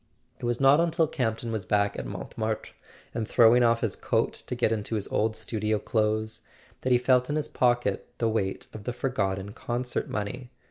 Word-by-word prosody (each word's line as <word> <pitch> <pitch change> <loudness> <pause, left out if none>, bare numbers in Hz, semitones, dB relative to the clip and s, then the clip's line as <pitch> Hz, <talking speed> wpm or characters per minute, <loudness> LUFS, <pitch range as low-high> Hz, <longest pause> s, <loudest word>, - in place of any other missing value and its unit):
It - - -5
was 120 0 0
not 135 +2 +6
until 165 -1 +3
Camp 120 -7 -1
ton 115 0 -5
was 110 -3 -2
back 100 +2 +1
at - - -5
Montmartre, 110 0 -4 0.4
and 115 -2 -2
throwing 120 +1 +6
off 115 -1 +3
his 110 -5 -1
coat - - 0
to - - -3
get - - +2
into 110 0 -2
his 105 - -2
old 110 +1 +1
studio 110 -1 -1
clothes, 110 0 0 0.4
that 130 - -1
he 125 - +7
felt 125 +1 +3
in 145 - 0
his 155 -1 -1
pocket 120 -5 +1
the 115 - +1
weight 105 -4 -1
of 105 -2 -9
the 125 - -2
forgotten 100 -6 -2
concert 125 +2 -3
money. 120 +5 -4
115 Hz, 195 wpm, -27 LUFS, 105-125 Hz, 0.4 s, he